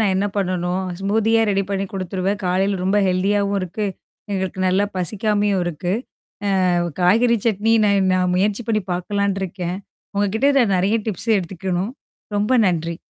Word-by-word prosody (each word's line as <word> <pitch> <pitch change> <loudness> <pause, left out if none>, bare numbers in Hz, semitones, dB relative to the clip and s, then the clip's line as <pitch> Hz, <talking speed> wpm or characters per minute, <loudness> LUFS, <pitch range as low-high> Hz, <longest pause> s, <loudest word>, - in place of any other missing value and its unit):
நான் 200 -4 +2
என்ன 200 - +1
பண்ணணும்? 185 -1 -1 0.2
ஸ்மூதியா 220 +3 +2
ரெடி 195 0 +1
பண்ணி 195 0 -1
குடுத்துருவேன். 190 +1 -2
காலையில 190 +1 +1
ரொம்ப 195 +2 +2
ஹெல்தியாவும் 200 +2 +1
இருக்கு. 185 +4 -3 0.5
எங்களுக்கு 190 -1 -2
நல்லா 190 +2 +3
பசிக்காமையும் 205 +1 0
இருக்கு. 175 +1 -2 0.8
அ - - +3 0.3
காய்கறி 230 +6 +4
சட்னி 220 +1 +2
நான் 200 -2 +3
நான் 180 -1 +1
முயற்சி 205 +5 +1
பண்ணி 215 -1 +2
பார்க்கலான்ட்டுருக்கேன். 190 -1 -2 0.4
உங்க 205 - +3
கிட்ட 270 +5 +3
நான் 210 -6 +3
நெறைய 200 +5 +2
டிப்ஸ் 210 +2 -3
எடுத்துக்கணும். 185 +3 -3 0.4
ரொம்ப 210 +5 +1
நன்றி! 170 -1 -1
195 Hz, 140 wpm, -21 LUFS, 185-205 Hz, 0.8 s, காய்கறி